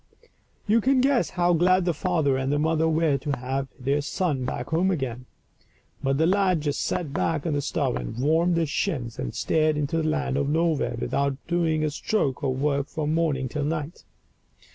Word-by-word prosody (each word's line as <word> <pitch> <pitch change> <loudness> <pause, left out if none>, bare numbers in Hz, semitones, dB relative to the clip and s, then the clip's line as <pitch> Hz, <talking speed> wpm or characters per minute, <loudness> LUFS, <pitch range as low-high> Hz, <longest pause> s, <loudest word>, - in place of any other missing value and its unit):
You 220 +2 +3
can 265 +3 +3
guess 265 -1 +2
how 175 0 +3
glad 180 +2 +3
the 175 - +1
father 160 -4 +1
and 130 +1 -1
the 145 - +2
mother 160 +1 +2
were 155 -3 +2
to 140 +1 -2
have 135 +2 -3
their 140 +3 0
son 145 -4 -1
back 125 0 -4
home 170 +4 +2
again. 130 -7 -3 0.7
But 135 0 +1
the 160 - +3
lad 185 -2 +2
just 145 -1 -1
sat 155 -6 -2
back 160 0 -1
of 165 - 0
the 145 - 0
stove 60 - -1
and - - -6
warmed 165 +6 +2
his 160 -3 0
shins, 130 - -2
and - - -4
stared 155 -1 +1
into 150 +2 -1
the 155 -1 +1
Land 150 -3 -1
of 140 0 0
Nowhere, 160 -1 +1
without 140 -1 -1
doing 165 -3 +1
a 155 - 0
stroke 145 -4 -1
of 130 -2 -1
work 140 -1 0
from 155 0 -2
morning 155 -5 0
till 145 +3 -3
night. 155 +2 -3
155 Hz, 195 wpm, -25 LUFS, 140-170 Hz, 0.7 s, You